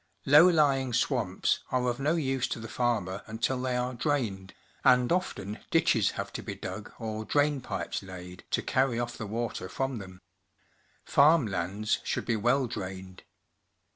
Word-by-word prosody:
Low 150 +6 +8
lying 135 -6 +2
swamps 120 -5 +1
are 125 -1 0
of 120 +1 -1
no 150 +4 +1
use 135 -5 0
to 120 - -4
the 115 - -7
farmer 110 -6 -1
until 120 +4 -1
they 125 -1 0
are 125 +1 -1
drained, 120 -8 -2 0.3
and 125 -1 +5
often 110 - -2
ditches - - +3
have - - -4
to - - -4
be - - -6
dug - - -7
or 110 -1 -4
drain 145 +3 +1
pipes - - -4
laid 90 -1 -10
to - - 0
carry 130 -2 +1
ofi" 120 0 -3
the 105 - -5
water 115 -3 -3
from 135 -3 -2
them. 95 -1 -10 0.9
Farm 150 0 +5
lands 100 +2 -1
should - - -2
be 115 - +1
well 120 +5 +2
drained. 95 -4 -7
120 Hz, 165 wpm, -29 LUFS, 100-135 Hz, 0.9 s, Low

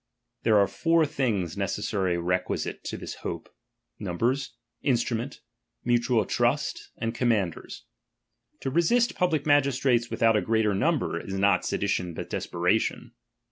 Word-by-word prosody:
There 110 -2 +4
are 100 - +6
four 165 +7 +2
things 105 - -1
necessarily 100 -2 -1
requisite 90 +2 -2
to - - -4
this - - -6
hope. - - -6 0.5
Numbers, 115 +8 -1 0.3
instruments, 120 0 -1 0.4
mutual 120 -2 +2
trust, - - 0
and 115 0 -2
commanders. 110 -8 -1 0.8
To 135 - -2
resist 230 - +3
public 160 -5 0
magistrates 135 -4 +3
without 115 -1 +3
a 105 - +3
great 110 +3 +1
number, 105 - +1
is 95 - -6
not 95 -1 +3
sedi 100 - -1
tion, 90 -4 -1
but - - -6
desperation. - - 0
115 Hz, 130 wpm, -27 LUFS, 100-135 Hz, 0.8 s, are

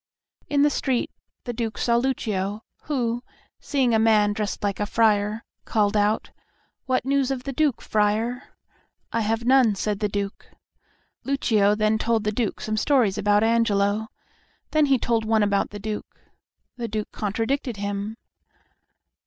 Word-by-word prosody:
In 285 -1 +3
the 295 - +4
street 260 -4 -1 0.3
the 240 - -4
Duke 225 -2 -3
saw 235 -1 +2
Lucio, 215 -5 -1 0.2
who, 240 -5 -1 0.4
seeing 265 -5 +1
a 220 - +4
man 215 -2 +4
dressed 205 0 -3
like 200 -2 -1
a 205 - -1
friar, 215 0 +2 0.2
called 210 -1 +1
out, 210 +1 +1 0.6
"What 255 -1 +1
news 275 -1 +1
of 265 -2 -3
the 275 - -4
Duke, 290 -2 +1
friar?" 220 +5 -1 0.6
"I 230 - +1
have 225 +2 -1
none," 250 -4 +5
said 205 +1 -2
the 210 -1 0
Duke. 200 0 -4 0.8
Lucio 215 -7 +2
then 215 0 +1
told 225 -1 +1
the 210 - 0
Duke 215 -1 -2
some 215 0 -2
stories 225 -6 +2
about 205 +1 +3
Angelo. 220 -2 +2 0.6
Then 305 -1 +3
he 270 -1 +4
told 230 -2 0
one 220 -1 +2
about 200 -1 +1
the 205 - -8
Duke. 210 +1 -6 0.6
The 235 -1 -3
Duke 215 -1 -4
contradicted 225 +4 -2
him. 205 +2 -4
220 Hz, 155 wpm, -24 LUFS, 205-245 Hz, 0.8 s, none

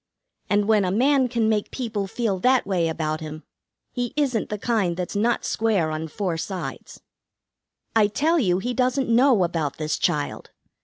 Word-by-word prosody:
And 205 0 +2
when 215 -2 +4
a 185 - 0
man 260 +6 +3
can 235 -2 0
make 215 -2 0
people 220 -6 -3
feel 205 -2 -1
that 255 +5 +3
way 180 -4 0
about 155 -1 -2
him, 155 0 -7 0.5
he 245 0 -3
isn't 260 -7 0
the 210 - -3
kind 200 -6 0
that's 180 +2 -4
not 230 +4 +1
square 205 -8 +1
on 155 +1 -3
four 175 +1 -3
sides. 185 +3 -6 0.9
"I 215 -2 +5
tell 310 +10 +1
you, 180 -9 +2
he 245 +6 -2
doesn't 255 +1 0
know 245 -5 +5
about 165 -5 -2
this 155 0 -2
child. 150 -4 -1
205 Hz, 170 wpm, -24 LUFS, 175-245 Hz, 0.9 s, I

